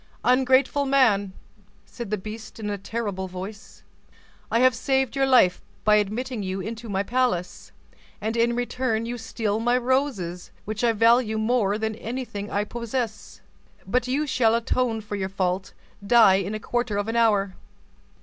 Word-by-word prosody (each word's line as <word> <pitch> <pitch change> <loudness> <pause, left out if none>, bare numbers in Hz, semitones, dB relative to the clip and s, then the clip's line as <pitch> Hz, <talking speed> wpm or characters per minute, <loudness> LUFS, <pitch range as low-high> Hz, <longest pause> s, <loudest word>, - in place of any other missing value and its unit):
"Ungrateful 260 +2 +3
man!" 220 -8 +3 0.5
said 235 -4 -8
the 210 - -1
beast 215 +3 -9
in 210 -1 -3
a 205 - -2
terrible 200 -2 -4
voice, 190 +3 -9 0.7
"I - - +1
have 255 0 +5
saved 265 +1 0
your 270 0 +2
life 245 -9 +4 0.2
by 210 0 +5
admitting 220 +4 -2
you 190 0 -3
into 225 +4 -6
my 195 0 0
palace, 235 -6 -1 0.5
and 220 +2 -2
in 235 0 +2
return 245 -2 -1
you 240 +1 -4
steal 220 -1 -2
my 240 +2 +2
roses, 245 -9 -1 0.2
which 215 +2 -4
I 235 -1 +4
value 230 0 +3
more 220 -2 +1
than 220 0 -2
anything 225 -2 -5
I 205 - 0
possess. 235 0 -5 0.4
But 250 +5 0
you 280 +4 0
shall 230 -5 +2
atone 235 -1 0
for 210 0 -6
your 190 -1 -3
fault—die 195 +3 +2
in 195 +2 -1
a - - -4
quarter 240 -1 -2
of 205 +1 -1
an 225 - -2
hour. 205 -4 +2
225 Hz, 160 wpm, -24 LUFS, 205-245 Hz, 0.7 s, have